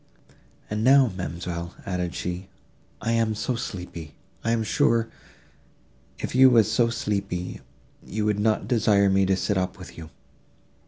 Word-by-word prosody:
"And 105 +1 -2
now, 130 -1 +6
ma'amselle," 85 0 -5
added 90 -2 -3
she, 90 +1 -4 0.5
"I 115 - -1
am 115 -1 +1
so 125 +4 -2
sleepy!—I 90 - -7
am 115 -1 +1
sure, 115 +1 +2 1.1
if - - -5
you 130 +1 +7
were 115 -3 +6
so 115 +2 +2
sleepy, 100 -6 -3 0.4
you 105 +2 -3
would 105 -1 +1
not 110 +1 +1
desire 105 -4 +3
me 95 0 +3
to 95 - +3
sit 100 0 0
up 95 +1 -3
with 90 -2 -11
you." 80 -1 -9
105 Hz, 145 wpm, -25 LUFS, 90-115 Hz, 1.1 s, you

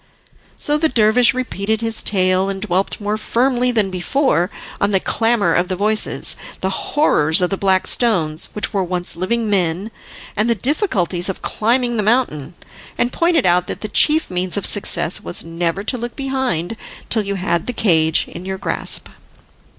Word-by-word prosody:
So 295 +1 +3
the 320 0 +2
dervish 235 +1 +4
repeated 220 -3 -2
his 225 -1 0
tale, 185 -1 +1
and 195 -1 -4
dwelt 190 -1 -1
more 210 0 -2
firmly 250 +2 +1
than 215 -5 0
before 185 - 0 0.3
on 200 - +2
the 195 -2 +2
clamour 225 +1 +1
of 175 +1 +1
the 185 - -2
voices, 215 +3 +1 0.3
the 190 - -1
horrors 170 - +2
of 180 0 +1
the - - +1
black 190 -1 +1
stones, 165 -10 +1
which 210 - -3
were 195 -2 0
once 180 -1 0
living 220 +6 -1
men, 190 +1 0 0.4
and 215 +3 0
the 235 - +3
difficulties 195 - -1
of 190 - -6
climbing 240 +2 0
the - - +1
mountain; 210 - 0 0.4
and 240 +1 0
pointed 335 - +2
out 180 0 +2
that - - -6
the 215 - -4
chief 305 +3 +3
means 180 +1 0
of 200 - -2
success 175 -4 +1
was - - -4
never 170 +3 -3
to 250 +3 0
look 240 +1 -6
behind 265 - -2 0.3
till 225 - +4
you 200 -1 -3
had 175 -3 -2
the - - 0
cage 160 -9 +2
in - - -9
your 190 0 -4
grasp. - - 0
200 Hz, 175 wpm, -18 LUFS, 180-235 Hz, 0.4 s, dervish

